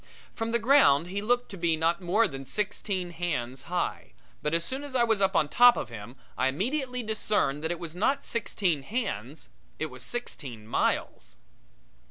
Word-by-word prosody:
From 225 0 -3
the 235 - +3
ground 225 - +5
he 200 +2 -3
looked 245 +3 +1
to 195 - -8
be 165 -2 +1
not 165 +4 +1
more 205 +6 +3
than 135 -5 -7
sixteen 185 +4 -2
hands 135 -8 -3
high, 180 0 -2 0.3
but 150 - -1
as 170 0 0
soon 265 +7 -4
as 285 -2 -7
I 245 - +4
was 225 -3 +2
up 195 0 +2
on 150 - +3
top 245 +9 +7
of - - -3
him 115 +2 -9 0.2
I 130 - +2
immediately 250 - -1
discerned 210 -9 0
that 160 - -1
it 175 - -2
was 170 -2 -7
not 270 +9 +1
sixteen 190 -9 0
hands 150 - -4 0.3
it 155 - -3
was 130 0 -10
sixteen 130 - -5
miles. 115 - -1
180 Hz, 185 wpm, -28 LUFS, 145-230 Hz, 0.3 s, top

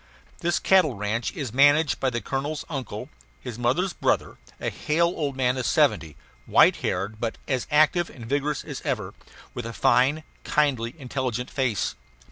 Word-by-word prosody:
This 175 0 +1
cattle 180 -9 +3
ranch 105 +3 -2
is 130 -7 -5
managed 145 +3 +4
by 135 - +1
the 120 -2 -3
colonel's 140 +6 -3
uncle, 130 -4 -5 0.3
his 120 -3 -7
mother's 155 +10 +1
brother, - - 0 0.2
a - - -2
hale 170 +3 +1
old 145 -4 -2
man 125 0 +1
of 125 - -2
seventy, 80 -3 +2 0.3
white - - +5
haired 100 +4 -3
but 115 -1 -3
as 130 -3 -1
active 155 +3 +3
and 120 - -11
vigorous 145 +4 -1
as 145 -4 -7
ever; 110 -10 -3 0.4
with 120 -1 -5
a 115 - -6
fine, 145 +8 +3 0.2
kindly, 130 -5 0
intelligent 125 -3 -3
face. 130 -7 0
130 Hz, 160 wpm, -25 LUFS, 120-150 Hz, 0.4 s, white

